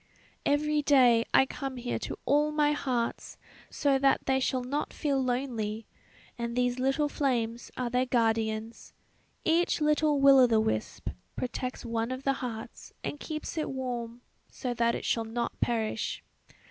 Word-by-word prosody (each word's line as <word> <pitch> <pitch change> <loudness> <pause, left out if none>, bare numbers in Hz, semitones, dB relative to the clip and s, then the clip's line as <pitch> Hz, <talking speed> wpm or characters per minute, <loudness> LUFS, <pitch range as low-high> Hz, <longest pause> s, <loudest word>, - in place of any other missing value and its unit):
"Every 300 +1 +2
day 250 -5 +5
I 265 - +6
come 270 -1 -5
here 245 0 -3
to - - -5
all 295 +2 +3
my 300 -1 +3
hearts, 250 -5 -2 0.3
so 280 -2 +1
that 275 0 +3
they 265 0 +2
shall 255 -1 0
not 280 +4 -3
feel 275 -3 0
lonely; 235 -4 -2 0.5
and 235 0 -3
these 245 0 +1
little 270 +3 +2
flames 240 -5 -1
are 245 -2 -2
their 250 +1 +1
guardians. 225 -2 -1 0.5
Each 335 +2 +2
little 300 -1 +2
will 275 -1 +7
o' 255 - +7
the 225 -2 +3
wisp 220 0 -2 0.3
protects 255 0 -4
one 230 0 -1
of 255 +1 -5
the 275 - +2
hearts 225 -3 -7
and 290 - -4
keeps 310 +1 -5
it 310 - -2
warm, 245 -3 -4 0.3
so 250 -3 -4
that 235 0 +1
it - - -5
shall 230 - +1
not 230 +2 -4
perish. 220 -2 -1
255 Hz, 160 wpm, -29 LUFS, 235-280 Hz, 0.5 s, will